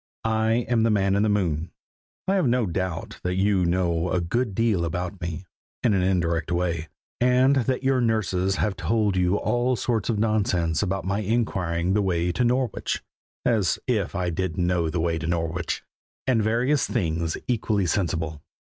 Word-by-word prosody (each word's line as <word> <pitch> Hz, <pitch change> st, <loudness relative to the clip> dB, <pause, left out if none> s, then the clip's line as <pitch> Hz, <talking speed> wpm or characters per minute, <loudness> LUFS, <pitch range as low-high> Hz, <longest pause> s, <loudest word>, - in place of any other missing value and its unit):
I 110 Hz, +1 st, +1 dB
am 115 Hz, -1 st, +2 dB
the 115 Hz, -, +3 dB
Man 100 Hz, -2 st, +2 dB
in 100 Hz, -, +2 dB
the 110 Hz, -, +2 dB
Moon. 90 Hz, -5 st, 0 dB, 0.6 s
I 190 Hz, -, +2 dB
have 185 Hz, -8 st, +2 dB
no 120 Hz, -1 st, +2 dB
doubt 90 Hz, -1 st, -3 dB
that 90 Hz, 0 st, -1 dB
you 95 Hz, -1 st, +2 dB
know 85 Hz, -1 st, +1 dB
a 90 Hz, -, +2 dB
good 105 Hz, +5 st, -1 dB
deal 110 Hz, -6 st, +2 dB
about 90 Hz, +3 st, -3 dB
me, 85 Hz, +2 st, -4 dB, 0.4 s
in 115 Hz, -, +3 dB
an 95 Hz, -, +2 dB
indirect 85 Hz, -3 st, 0 dB
way, 85 Hz, -2 st, -1 dB, 0.3 s
and 125 Hz, +2 st, +4 dB
that 130 Hz, +1 st, 0 dB
your 130 Hz, -1 st, +2 dB
nurses 95 Hz, -5 st, +1 dB
have 105 Hz, -1 st, 0 dB
told 105 Hz, 0 st, +1 dB
you 90 Hz, +1 st, +2 dB
all 120 Hz, +3 st, +1 dB
sorts 115 Hz, -3 st, -1 dB
of 115 Hz, -, +1 dB
nonsense 95 Hz, -7 st, +1 dB
about 95 Hz, -1 st, -2 dB
my 100 Hz, +2 st, 0 dB
inquiring 95 Hz, -5 st, 0 dB
the 105 Hz, -, +3 dB
way 90 Hz, -2 st, 0 dB
to 125 Hz, -, 0 dB
Norwich 125 Hz, -2 st, 0 dB, 0.4 s
as 110 Hz, -7 st, +2 dB
if 110 Hz, -7 st, -1 dB
I 90 Hz, -1 st, -1 dB
didn't 90 Hz, +1 st, -1 dB
know 85 Hz, -2 st, +1 dB
the 85 Hz, +2 st, -2 dB
way 80 Hz, 0 st, 0 dB
to 80 Hz, -, -4 dB
Norwich! 85 Hz, 0 st, -2 dB, 0.4 s
and 125 Hz, -4 st, +2 dB
various 120 Hz, +7 st, +1 dB
things 85 Hz, -6 st, -1 dB
equally 105 Hz, -5 st, +1 dB
sensible. 80 Hz, -5 st, -1 dB
95 Hz, 175 wpm, -25 LUFS, 85-115 Hz, 0.6 s, and